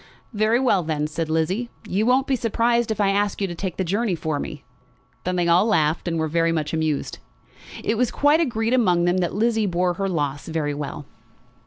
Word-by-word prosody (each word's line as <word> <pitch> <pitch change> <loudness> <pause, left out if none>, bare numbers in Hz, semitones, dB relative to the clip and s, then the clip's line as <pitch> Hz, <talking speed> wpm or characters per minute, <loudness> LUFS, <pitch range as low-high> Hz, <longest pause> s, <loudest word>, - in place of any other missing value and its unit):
"Very 215 +3 +2
well, 235 -8 +3
then," 155 -2 -2
said 155 +1 -3
Lizzie. 180 +9 0 0.2
"You 210 +3 0
won't 260 +2 +3
be 275 - +1
surprised 235 0 +1
if 215 -1 -2
I 200 -1 +3
ask 205 0 0
you 200 - 0
to 180 - -4
take 180 0 -5
the 190 - 0
journey 200 +2 0
for 155 -2 -2
me." 145 - -6 0.6
Then 180 0 -1
they 175 -1 +1
all 175 +5 +4
laughed, 160 -6 +1
and 165 -1 -1
were 160 0 0
very 165 +1 +1
much 155 -2 -2
amused. 155 -2 -1 0.6
It 220 +1 0
was 250 -2 +2
quite 290 +2 +3
agreed 235 -7 0
among 180 -9 +3
them 175 +1 +2
that 175 0 -1
Lizzie 220 0 +1
bore 180 0 +1
her 195 +2 -2
loss 145 -5 -2
very 155 -3 -2
well. 145 0 -6
185 Hz, 210 wpm, -23 LUFS, 160-225 Hz, 0.6 s, all